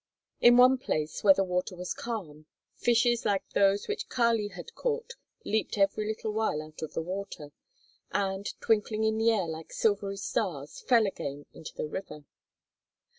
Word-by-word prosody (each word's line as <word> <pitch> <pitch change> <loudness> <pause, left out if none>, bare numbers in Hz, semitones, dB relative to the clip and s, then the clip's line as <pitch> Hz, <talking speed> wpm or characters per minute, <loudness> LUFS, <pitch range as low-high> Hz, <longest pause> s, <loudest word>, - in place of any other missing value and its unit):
In 240 0 +7
one 255 +1 +7
place 155 -10 -2
where 195 -2 +8
the 195 - +2
water 180 0 -2
was 180 0 -4
calm, 160 -11 -6 0.3
fishes 240 0 +2
like 195 -1 0
those 200 0 +2
which 435 +1 -3
Kali 230 -4 +2
had 470 - -10
caught 480 -1 -2 0.3
leaped 215 0 -1
every 200 +2 +2
little 220 0 -3
while 215 -8 0
out 155 0 -10
of 160 - -6
the 165 - -1
water, 180 -5 -6 0.6
and, 195 0 -1
twinkling 215 0 +1
in 220 0 +1
the 225 +1 +4
air 210 -5 +2
like 160 0 -7
silvery 200 -2 0
stars, 175 -7 -3
fell 235 -4 +4
again 145 -7 -5
into 160 - -10
the - - -3
river. 150 -3 -7
200 Hz, 165 wpm, -29 LUFS, 175-225 Hz, 0.6 s, where